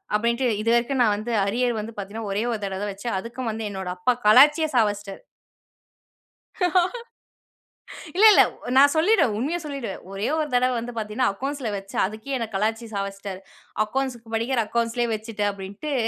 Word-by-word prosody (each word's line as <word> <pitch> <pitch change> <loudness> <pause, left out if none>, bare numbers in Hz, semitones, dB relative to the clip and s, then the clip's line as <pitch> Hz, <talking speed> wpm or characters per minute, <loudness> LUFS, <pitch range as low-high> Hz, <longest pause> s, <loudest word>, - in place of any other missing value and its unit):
அப்டின்ட்டு 235 +4 +1
இது 230 - 0
வரைக்கும் 240 +3 +1
நான் 220 -4 +4
வந்து 220 +3 -5
அரியர் 240 +3 0
வந்து 215 +2 -5
பார்த்தீங்கன்னா, 205 +2 -6
ஒரே 205 +3 0
1 225 - -2
தடவ 190 -1 -3
தான் 205 0 -2
வச்சேன். 200 +3 -4
அதுக்கும் 235 +3 -5
வந்து 220 +1 -5
என்னோட 190 -2 -6
அப்பா 245 +8 +2
கலாச்சியே 295 +9 +7
சாவஸ்ட்டாரு. 205 -4 0 2.9
இல்ல, 410 +4 +5
இல்ல. - - +7 0.4
நான் 285 +1 +7
சொல்லிடுவன். 320 - +3
உண்மைய 295 +9 -1
சொல்லிவிடுவன். 275 -9 -5
ஒரே 195 +3 -2
1 310 - 0
தடவ 250 +1 +3
வந்து 240 +1 -6
பார்த்தீங்கன்னா 220 +3 0
அக்கவுண்ட்ஸ்ல 265 +2 -4
வச்சன். 195 0 -2
அதுக்கே 220 +7 -5
என்ன 230 - -3
கலாய்ச்சு 225 +3 -1
சாவச்டாரு. 195 -1 -5 0.4
அக்கவுண்ட்ஸ்க்கு 240 -1 -4
படிக்கிற 235 +2 0
அக்கவுண்ட்ஸ்லேயே 235 +1 -1
வச்சிட்டேன் 210 -2 -2
அப்டின்ட்டு 200 +9 -6
230 Hz, 155 wpm, -24 LUFS, 205-255 Hz, 2.9 s, கலாச்சியே